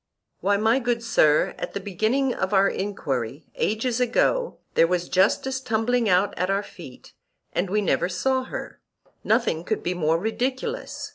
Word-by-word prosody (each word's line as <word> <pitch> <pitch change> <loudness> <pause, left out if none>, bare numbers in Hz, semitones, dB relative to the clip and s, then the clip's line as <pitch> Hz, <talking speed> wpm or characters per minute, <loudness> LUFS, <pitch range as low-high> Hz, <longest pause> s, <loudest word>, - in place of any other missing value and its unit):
Why, 200 +1 +2
my 220 +5 +3
good 240 -2 -1
sir, 155 -9 +3
at - - -5
the - - -1
beginning 220 +7 0
of 190 +2 -1
our 195 +1 +5
enquiry, 145 - -3
ages 230 +3 -1
ago, 475 - +1 0.2
there 165 - +4
was 180 0 -1
justice 260 +8 +1
tumbling 230 -1 +1
out 185 +2 +2
at 180 +1 0
our 195 +1 +1
feet, 165 -11 -13 0.4
and 180 +1 -1
we 210 +2 +1
never 185 -2 +1
saw 260 +6 0
her; - - -7 0.4
nothing 160 +1 +1
could 215 +4 -2
be 180 - -1
more 165 -2 +1
ridiculous. 255 - -3
205 Hz, 160 wpm, -24 LUFS, 180-245 Hz, 0.4 s, our